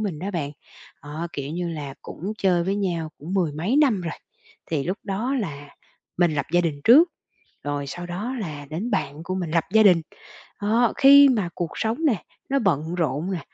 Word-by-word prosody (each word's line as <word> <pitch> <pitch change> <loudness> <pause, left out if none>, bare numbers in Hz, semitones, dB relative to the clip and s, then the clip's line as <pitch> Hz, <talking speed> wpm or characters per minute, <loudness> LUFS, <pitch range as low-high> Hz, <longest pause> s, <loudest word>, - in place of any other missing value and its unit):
mình 195 -8 -3
đó 195 +5 -4
bạn, 155 -6 -3 0.5
đó, 155 +4 -5
kiểu 140 0 -5
như 175 +1 -2
là, 145 -4 -6
cũng 195 +6 -6
chơi 180 -3 +2
với 195 +2 0
nhau 170 -5 -1
cũng 165 +6 -6
mười 175 -6 +1
mấy 175 - -1
năm 265 -10 +4
rồi. 165 -3 -4 0.6
Thì 150 -4 0
lúc 185 +5 -2
đó 220 +6 -1
là 145 -6 -6 0.5
mình 175 -3 +2
lập 145 - -1
gia 175 - +5
đình 155 -4 -2
trước, 305 +9 +8 0.6
rồi 145 -1 -2
sau 175 +6 -6
đó 205 +9 -4
là 150 -6 -6
đến 195 +10 -3
bạn 160 -6 -2
của 185 - -3
mình 180 -4 -3
lập 165 0 +2
gia 220 - +6
đình. 180 -5 +6 0.6
Đó, 225 +3 +2
khi 280 +1 +8
mà 210 -9 +1
cuộc 170 -2 -3
sống 220 +3 -1
nẻ 240 -10 +3 0.3
nó 275 - +2
bận 170 - 0
rộn 165 +2 -1
nè, 180 - -2
175 Hz, 205 wpm, -24 LUFS, 155-210 Hz, 0.6 s, trước